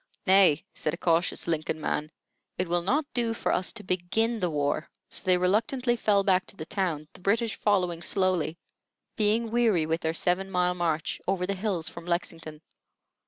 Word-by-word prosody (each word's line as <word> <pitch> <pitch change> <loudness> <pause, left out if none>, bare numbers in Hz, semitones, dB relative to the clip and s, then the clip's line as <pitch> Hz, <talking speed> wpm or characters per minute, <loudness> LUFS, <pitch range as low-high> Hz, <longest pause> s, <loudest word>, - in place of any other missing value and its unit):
"Nay," 185 -6 +5
said 155 - -2
a - - -15
cautious 170 0 +1
Lincoln 155 -1 -1
man, 150 0 -2 0.5
"it 185 - -1
will 175 +1 +1
not 280 - +1
do 230 -2 0
for - - -1
us 180 - +1
to 215 - -8
begin 200 +6 0
the 180 -3 0
war." 145 0 -1 0.2
So - - -1
they 185 -1 +4
reluctantly 230 +7 +1
fell 205 -4 +2
back 190 -2 +2
to - - -11
the 155 - -7
town, 165 -5 -2
the - - -15
British 220 +4 0
following 180 -5 +1
slowly, 180 -2 0 0.6
being 220 +2 +1
weary 225 -9 +3
with 160 +2 -1
their 160 0 -1
seven 180 +3 0
mile 180 -1 +1
march 165 -3 -2
over 185 -1 +1
the 200 - -1
hills 190 -4 -2
from 170 0 -6
Lexington. 165 -2 -3
180 Hz, 180 wpm, -27 LUFS, 165-205 Hz, 0.6 s, Nay